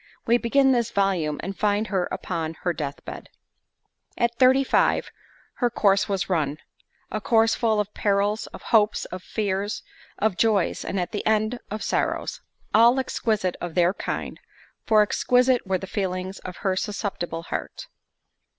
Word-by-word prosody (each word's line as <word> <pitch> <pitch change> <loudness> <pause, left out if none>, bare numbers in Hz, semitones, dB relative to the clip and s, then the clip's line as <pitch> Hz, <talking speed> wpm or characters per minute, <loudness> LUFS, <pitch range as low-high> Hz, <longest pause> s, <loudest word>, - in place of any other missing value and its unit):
We 235 +1 +4
begin 270 +3 +3
this 235 -3 +1
volume, 190 -8 0
and 195 +1 -4
find 210 +1 +1
her 185 -3 0
upon 165 -2 -3
her 175 - +1
death 145 -3 -5
bed. - - -8 0.9
At 235 0 +1
thirty 260 +1 +6
five, - - +2 0.5
her 245 - +2
"Course 200 -4 +2
was 195 +1 -1
run"—a 160 +5 -4
course 225 +1 +3
full 220 -3 +1
of 210 0 -2
perils, 205 +1 0
of - - -11
hopes, 215 -2 +2
of 185 - -7
fears, 205 0 -2 0.3
of 210 -3 0
joys, 210 -4 +2
and 195 - -2
at 175 - -2
the 205 - -3
end, 215 +2 +1
of 215 +1 -4
sorrows; - - -1 0.3
all 235 +4 +6
exquisite 215 -7 -1
of 175 -2 -5
their 175 0 +3
kind, - - -4 0.5
for 215 -2 +6
exquisite 250 +2 +2
were 190 0 +1
the 190 - -7
feelings 190 -1 -3
of 180 - -8
her 190 -1 +2
susceptible 185 -5 -3
heart. - - -5
205 Hz, 155 wpm, -24 LUFS, 185-225 Hz, 0.9 s, thirty